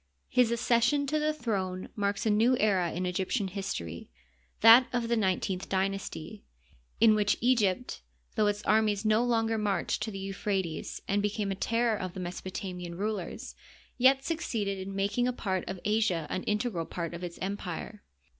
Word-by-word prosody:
His 250 -2 +4
accession 240 +4 +2
to 305 +2 0
the 305 0 +1
throne 195 -10 -3
marks 205 +2 -1
a 220 - +3
new 230 +5 +4
era 190 -6 +2
in 180 +2 -3
Egyptian 190 +3 -1
history, 85 - -5 0.5
that 230 +3 +9
of 240 -2 -1
the 235 - +3
nineteenth 190 -2 -1
dy 190 0 +2
nasty, 195 0 -7 0.6
in 220 0 +7
which 210 -1 +2
Egypt, 235 -2 +1 0.3
though 215 -2 +3
its 205 +1 -1
armies 215 -1 +2
no 215 +2 +4
longer 225 -2 +1
marched 205 -1 -1
to 215 - -2
the 195 - -6
Euphrates 195 -3 -3
and 200 +1 +1
became 210 0 -1
the - - 0
terror 230 +3 +1
of 185 0 -5
the - - -5
Mesopotamian 180 -1 -5
rulers, 205 -2 -4 0.4
yet 265 +2 +4
succeeded 220 - -2
in 195 +1 -6
making 205 +5 +1
a - - +2
part 190 -6 -2
of 190 -1 -5
Asia 210 -6 +1
an 185 - -1
integral 210 -6 -1
part 170 -1 -4
of 170 +1 -7
its 175 -1 -6
empire. 195 +1 -5
205 Hz, 170 wpm, -29 LUFS, 190-230 Hz, 0.6 s, that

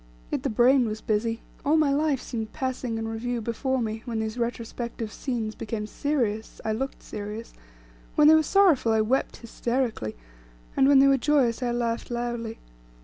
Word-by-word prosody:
Yet - - -1
the - - -1
brain 245 +3 +4
was 215 0 -3
busy; 225 +2 -1 0.2
all 300 +3 +3
my 295 -3 +3
life 295 -2 +1
seemed 220 -3 -5
passing 255 -4 -2
in 225 0 -3
review 235 +2 -2
before 245 +4 -1
me; 220 0 -3
when 235 -2 -3
these 220 0 -2
retrospective 235 -2 -4
scenes 230 -5 -3
became 210 -1 -4
serious, 225 -3 -2
I 220 - +1
looked 265 +5 -3
serious; 210 +2 -7 0.6
when 300 - +6
they 310 - +9
were 315 - +6
sorrowful, 315 - +4
I 220 - +3
wept 250 +5 0
hysterically; 235 - -2 0.6
when 275 +1 +5
they 270 - +7
were 275 0 +5
joyous, 260 -4 +2
I 245 - 0
laughed 235 -1 -1
loudly. 235 -2 -3
235 Hz, 170 wpm, -26 LUFS, 225-265 Hz, 0.6 s, they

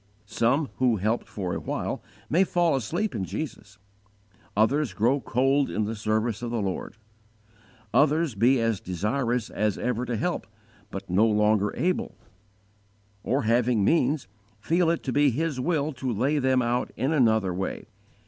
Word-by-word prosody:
Some 130 +7 +1
who 125 -3 +3
helped 110 +4 -1
for 95 -4 -4
a - - -2
while - - -3 0.3
may 175 +6 +3
fall 175 -4 +2
asleep 170 - -2
in 95 - -2
Jesus; 105 - -6 0.8
others 125 +2 +2
grow 120 +9 +2
cold 135 +4 +1
in 110 - -1
the 110 +2 -3
service 110 +1 -1
of 120 - -3
the 115 -1 -1
Lord; 100 +2 -4 1.0
others 150 0 +3
be 120 +5 +3
as 115 -3 0
desirous 115 +6 -1
as 105 -1 0
ever 125 0 -1
to 120 -2 -2
help, 175 +10 -2 0.4
but 100 -1 -7
no 100 +5 +3
longer 105 -1 +2
able; 180 +1 -1 1.1
or, 135 +6 0
having 115 -2 +2
means, 155 - +2 0.3
feel 165 - +2
it 170 - 0
to 130 - -2
be 145 0 +4
His 150 +2 -2
will 155 +1 0
to 130 0 -3
lay 135 +7 +1
them 130 -1 +2
out 120 +1 -1
in 135 - 0
another 110 - +3
way. 95 +2 -4
120 Hz, 160 wpm, -26 LUFS, 105-140 Hz, 1.1 s, be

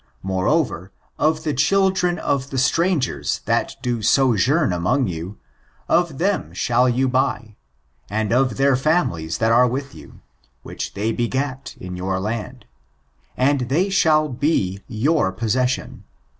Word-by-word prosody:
Moreover, 95 - 0 0.3
of 155 +1 +3
[from] 155 - -12
the 155 -2 -1
children 180 +4 +2
of 140 -1 -1
the 135 - -4
strangers 160 +2 0
that - - 0
do 120 -2 -1
sojourn 130 - +3
among 90 +10 +1
you, 90 +3 -6 0.5
of 170 -5 +1
them 195 +4 -1
shall 125 +1 +2
you 130 +2 +1
buy, 125 -4 -1 0.5
and 110 +2 -1
of 125 -3 +1
their 135 -1 +3
families, 125 - 0
that 110 0 +1
are 125 +2 +5
with 135 +3 -4
you, - - -14 0.4
which - - -6
they 105 +3 -1
begat 130 +3 -3
in 90 0 -7
your 95 +1 -2
land: 115 +4 -5 0.7
and 130 -1 +1
they 180 +8 +1
shall 155 -5 +3
be 120 - -1
your 125 - +1
possession. 125 +5 -2
130 Hz, 140 wpm, -21 LUFS, 110-150 Hz, 0.7 s, are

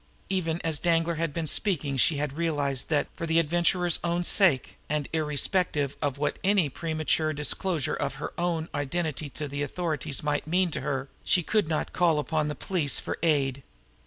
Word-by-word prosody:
Even 170 -4 0
as 160 -3 +1
Danglar 165 -1 +1
had 165 -3 0
been 165 +2 -3
speaking 155 -5 +1
she 145 +4 +3
had 145 -1 -2
realized 145 -5 -1
that, 150 -2 +2
for 165 - -5
the 160 +1 +2
Adventurer's 175 +2 +2
own 175 +1 0
sake, 175 - +3
and 150 -1 -1
irrespective 150 -1 +1
of 140 -3 -1
what 145 - -1
any 190 -5 +3
premature 155 +1 0
disclosure 150 +1 -1
of 140 -1 -2
her 135 - -6
own 170 -2 -1
identity 150 0 -2
to 150 +2 -6
the 140 +1 -4
authorities 150 -2 -2
might 150 0 -1
mean 180 +1 +2
to 145 - -2
her, 135 -1 -2 0.2
she 180 - +2
could 210 0 +1
not 155 - -2
call 170 -3 +3
upon 150 0 0
the 150 - -3
police 155 -2 +1
for - - -5
aid. 140 -5 +1
155 Hz, 180 wpm, -27 LUFS, 145-170 Hz, 0.2 s, she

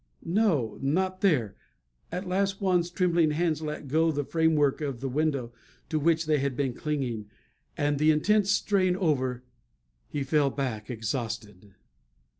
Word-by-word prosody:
No 165 - +1
not 185 +7 0
there! 125 - +2 0.6
At 180 +2 -4
last 195 +2 +1
Juan's 180 -3 +1
trembling 175 -3 +2
hands 160 0 0
let 150 -2 -5
go 160 +4 +2
the 145 -1 -1
framework 155 -2 +2
of 140 -5 -3
the 135 - -3
window 135 -3 -1 0.4
to 155 - 0
which 165 +1 +2
they 155 -1 +2
had 135 -2 -2
been 135 -3 0
clinging; 125 -8 -3 0.5
and, 145 -1 0
the 155 +1 +4
intense 200 +6 +3
strain 195 -2 +2
over, 130 -9 0 0.6
he 145 - -3
fell 145 0 +2
back 125 -6 -4
exhausted. 110 -4 -5
150 Hz, 145 wpm, -28 LUFS, 130-170 Hz, 0.6 s, the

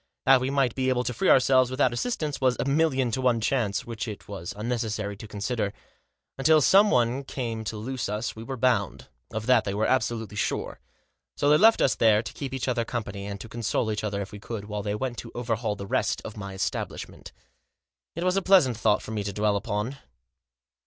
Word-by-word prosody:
That 135 -1 +6
we 130 - -1
might 135 -4 +1
be 130 -1 0
able 125 -1 +1
to 125 - -2
free 190 +6 +1
ourselves 130 -1 +5
without 130 -1 +1
assistance 150 - -2
was 130 -2 +2
a - - 0
million 140 -3 +2
to 130 - -1
one 125 -2 +2
chance 110 -3 0
which 115 0 -5
it 105 -2 -8
was 95 -4 -6
unnecessary 110 -2 -2
to 110 - -9
consider. 105 0 -2 0.7
Until 155 +3 +5
some 195 +8 +6
one 125 - +2
came 115 -4 -4
to 110 +1 -4
loose 125 +1 -4
us 105 +3 -3
we 110 - -8
were 130 +3 -5
bound. 115 -6 0 0.2
Of 110 -1 -4
that 125 -2 +4
they 100 - -3
were 110 +1 +1
absolutely 115 -5 -1
sure. - - -2 0.6
So 145 - +2
they 150 - +6
left 225 +3 +6
us 130 - +3
there 110 -1 +4
to - - -7
keep 140 -3 -5
each 135 -1 -3
other 120 -2 +1
company, 105 -4 -5
and 100 -1 -5
to - - -8
console 115 -1 -1
each 105 0 -3
other 100 -1 -2
if 95 - -11
we 105 - -9
could, 105 0 -6
while 105 0 -4
they 105 +1 -2
went 120 +1 -3
to 115 - -8
overhaul 115 -3 -1
the 100 - -7
rest 110 +3 0
of 110 - -7
my 100 -2 -7
establishment. 95 - -4 0.8
It 170 - -3
was 185 0 +2
a 195 - +2
pleasant 180 - +4
thought 105 -2 +2
for - - -7
me 105 -2 -2
to 100 - -3
dwell 105 +1 +1
upon. 105 +6 -3
115 Hz, 220 wpm, -26 LUFS, 105-130 Hz, 0.8 s, That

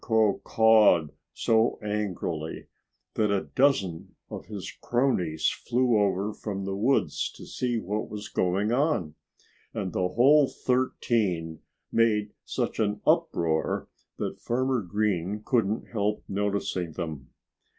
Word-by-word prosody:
Crow 110 -3 +2
cawed 110 -8 +5 0.2
so 115 +1 +2
angrily 95 -7 -3 0.5
that 105 -1 +1
a 100 -1 +1
dozen 100 - +1 0.2
of - - -7
his 105 -4 -6
cronies 105 - +1
flew 125 -1 +1
over 100 0 +1
from 100 -3 -5
the 95 0 -2
woods 120 +7 +1
to - - -11
see 125 -2 -2
what 105 0 -3
was 105 -1 -6
going 95 +4 0
on. 125 - +1 0.6
And 95 -6 -3
the 90 - +1
whole 135 +8 +5
thirteen 110 -12 -1 0.3
made 105 -2 +2
such - - -3
an 105 -1 0
uproar 80 -2 +1 0.3
that - - -4
Farmer 130 0 0
Green 100 0 -1
couldn't 110 -3 0
help 105 -1 -1
noticing 100 -4 -2
them. 80 -5 -6
105 Hz, 120 wpm, -27 LUFS, 90-115 Hz, 0.6 s, cawed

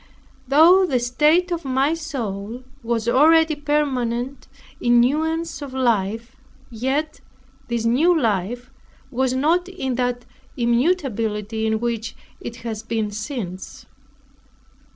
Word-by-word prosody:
Though 330 +8 +6
the 255 -6 +1
state 300 +9 +2
of 340 -1 -2
my 270 +3 +1
soul 245 -8 -5 0.2
was 230 -1 -2
already 315 +5 +5
permanent 270 -4 -1 0.3
in 240 0 +4
newness 320 +6 0
of 275 -2 -7
life; 230 -1 0 0.4
yet 265 +7 -2 0.5
this 235 -1 -2
new 315 +9 +3
life 235 +2 -1 0.4
was 260 0 0
not 335 +7 +1
in 265 -9 -3
that 245 -1 -2 0.3
immutability 235 - 0
in 220 0 0
which 230 -1 -3 0.2
it 235 - -7
has 220 -2 -4
been 220 -2 -2
since. 205 -4 -6
250 Hz, 110 wpm, -22 LUFS, 230-300 Hz, 0.5 s, Though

